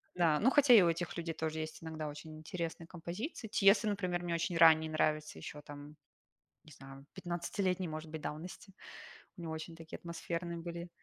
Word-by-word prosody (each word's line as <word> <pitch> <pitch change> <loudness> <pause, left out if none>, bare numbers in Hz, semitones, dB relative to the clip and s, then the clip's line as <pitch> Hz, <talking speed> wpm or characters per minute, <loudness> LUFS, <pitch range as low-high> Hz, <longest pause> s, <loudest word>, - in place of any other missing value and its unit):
Да. 165 -4 +3
Ну, 250 - +5
хотя 275 -2 +6
и 220 - +10
у 170 - +4
этих 175 +1 -2
людей 165 -1 -2
тоже 160 0 -3
есть 155 +1 -6
иногда 160 -1 -4
очень 155 +2 -8
интересные 165 +1 -5
композиции. 185 - -5
Тиесто, 205 +1 +5
например, 185 -4 -1
мне 175 -1 -1
очень 170 +1 0
ранний 160 -1 +7
нравится, 155 -1 0
еще 150 - -8
там, 145 +1 -10 0.7
не 155 - -16
знаю, 135 0 -12
пятнадцатилетней, 180 +1 -1
может 155 0 -6
быть, 155 -1 -5
давности. 175 +6 -7 0.6
У 175 - -9
него 165 -1 -4
очень 160 +1 -6
такие 165 -1 -8
атмосферные 170 0 -4
были 170 +1 -6
165 Hz, 180 wpm, -34 LUFS, 155-175 Hz, 0.7 s, и